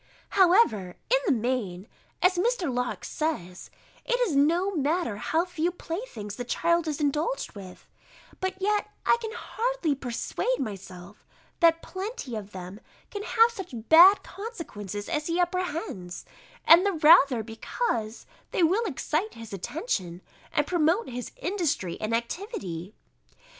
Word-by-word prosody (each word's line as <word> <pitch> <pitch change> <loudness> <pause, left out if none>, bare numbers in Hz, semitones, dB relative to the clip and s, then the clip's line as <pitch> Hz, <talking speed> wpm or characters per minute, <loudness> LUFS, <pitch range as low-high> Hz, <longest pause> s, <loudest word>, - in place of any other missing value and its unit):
However, 350 - +4 0.2
in - - +5
the - - +4
main, 225 -6 -1 0.4
as 365 +1 +6
Mr. 365 - 0
Locke 250 0 -2
says, 185 - -3 0.3
it - - 0
is 400 - +1
no 340 +8 +3
matter 305 - 0
how 320 - 0
few 350 -2 -1
playthings 330 - -6
the 245 - -3
child 335 +6 +1
is 300 -1 -2
indulged 300 - -1
with; 190 -3 -11 0.5
but 375 0 -3
yet 420 +2 0 0.2
I - - +5
can 445 -1 -4
hardly 475 -10 -1
persuade 275 - -2
myself, 195 -3 -7 0.4
that 330 -1 +4
plenty 380 - -5
of 205 -2 -6
them 185 +2 -8 0.3
can 410 - -4
have 455 +2 +4
such 385 - -8
bad 360 +5 +8
consequences 210 - -7
as 300 -2 -2
he 340 +1 0
apprehends; 345 - -2 0.4
and 340 +3 +8
the 400 -1 +1
rather, 300 -7 +6
because 225 - -3 0.2
they 360 - +1
will 390 +8 +3
excite 350 - -2
his 225 -2 -10
attention, 190 - -3 0.3
and 295 -3 +1
promote 345 - +1
his 245 -1 -6
industry 320 - -2
and 215 +1 -2
activity. 225 - -5
320 Hz, 135 wpm, -27 LUFS, -, 0.5 s, bad